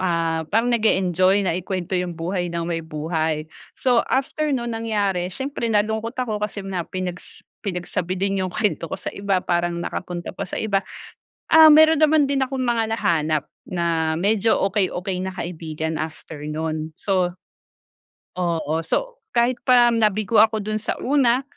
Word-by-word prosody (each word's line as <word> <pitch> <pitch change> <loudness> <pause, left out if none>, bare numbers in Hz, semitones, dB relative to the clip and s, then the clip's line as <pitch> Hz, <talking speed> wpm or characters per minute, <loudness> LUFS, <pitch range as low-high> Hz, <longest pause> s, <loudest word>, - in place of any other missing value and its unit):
ah, 165 -3 0
parang 230 +3 +2
nag-e-enjoy 190 -3 +3
na 180 - +1
ikwento 185 +1 -4
yung 180 -2 -1
buhay 175 +1 -2
ng 170 0 -3
may 165 -1 -2
buhay. 155 0 -2 0.3
So, 245 -3 +3
after 300 +3 0
nung 240 -4 -1
nangyari 205 -5 -1
siyempre 265 +2 -3
nalungkot 220 +2 0
ako 220 -5 -2
kasi 210 -1 -4
na 185 -4 -4
pinags 180 -1 -6 0.2
pinagsabi 180 -1 -3
din 195 +1 0
yung 185 - -2
kwento 190 -4 -1
ko - - -4
sa - - -6
iba 200 -1 0
parang 175 -1 0
nakapunta 175 0 -5
pa 195 -2 -6
sa - - -5
iba. 200 -3 +1 0.7
Ah, 315 -1 +9
meron 315 +1 +7
naman 305 -2 +4
din 270 -1 +1
akong 265 0 -4
mga 230 -3 0
nahanap 155 -7 0 0.2
na, 165 -2 0
medyo 215 +2 +2 0.2
okey-okey 190 -2 -1
na 190 - -4
kaibigan 160 -3 -4
after 155 -1 -6
'non. 155 +1 -3
So 185 -3 0 1.1
oo, 165 -3 0
so, - - -2 0.2
kahit 240 +1 +2
pa 245 -1 +6
nabigo 215 -1 +2
ako 220 -1 +5
dun 215 +1 -2
sa 215 - -2
una, 260 -2 +3
190 Hz, 155 wpm, -22 LUFS, 170-225 Hz, 1.1 s, Ah